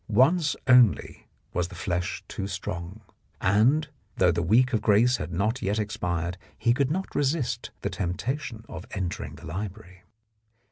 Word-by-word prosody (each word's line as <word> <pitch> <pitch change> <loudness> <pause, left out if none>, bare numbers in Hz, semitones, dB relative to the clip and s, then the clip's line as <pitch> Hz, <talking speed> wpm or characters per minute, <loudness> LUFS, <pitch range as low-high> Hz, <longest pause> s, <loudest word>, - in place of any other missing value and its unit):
Once 145 - +3
only 125 -5 +4 0.3
was 90 -1 0
the 90 - -11
flesh 90 +1 -2
too 95 - -4
strong, 95 +1 -5 0.4
and, 125 +11 +3 0.3
though - - +5
the - - 0
week 120 +9 +3
of 110 - +2
grace 115 +4 +4
had 75 +3 -5
not 105 +9 0
yet 100 +2 0
expired, 90 -5 -2 0.2
he 120 - +3
could 135 +1 +1
not 190 +5 -2
resist 140 -2 0
the - - 0
temptation 115 - -3
of 95 +1 -8
entering 90 -5 -3
the 80 +3 -12
library. 95 +2 -6
105 Hz, 150 wpm, -27 LUFS, 90-125 Hz, 0.4 s, though